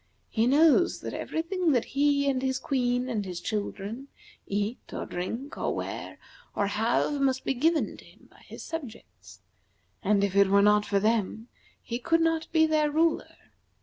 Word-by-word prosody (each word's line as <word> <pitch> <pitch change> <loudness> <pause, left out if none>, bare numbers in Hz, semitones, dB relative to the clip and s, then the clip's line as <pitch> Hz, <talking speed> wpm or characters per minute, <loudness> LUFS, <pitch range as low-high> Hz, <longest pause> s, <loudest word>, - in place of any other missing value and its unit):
He 225 +1 +2
knows 320 +5 +4
that - - -5
every 320 - -3
thing 350 -2 0
that 245 - +1
he, 280 0 +1
and 265 -2 +1
his 260 -1 0
queen, 250 -2 0
and 225 -5 -2
his 180 -3 -6
children 210 +5 -4 0.4
eat, 205 +4 -2
or - - -4
drink, 230 +10 -5
or - - -1
wear, - - -5 0.4
or 200 - +1
have 230 +7 0
must 265 -1 +1
be - - +1
given 315 +5 +1
to - - -15
him - - -20
by - - -20
his - - -9
subjects, 285 -9 -9 0.6
and 200 0 +2
if 200 -1 -1
it 200 0 +6
were 200 +1 +4
not 210 0 +4
for 200 -1 +2
them 220 +2 0 0.3
he 235 +1 -4
could 330 +6 +2
not 325 0 +1
be 320 -1 +4
their 310 -1 +2
ruler. 320 +2 0
255 Hz, 180 wpm, -27 LUFS, 210-300 Hz, 0.6 s, it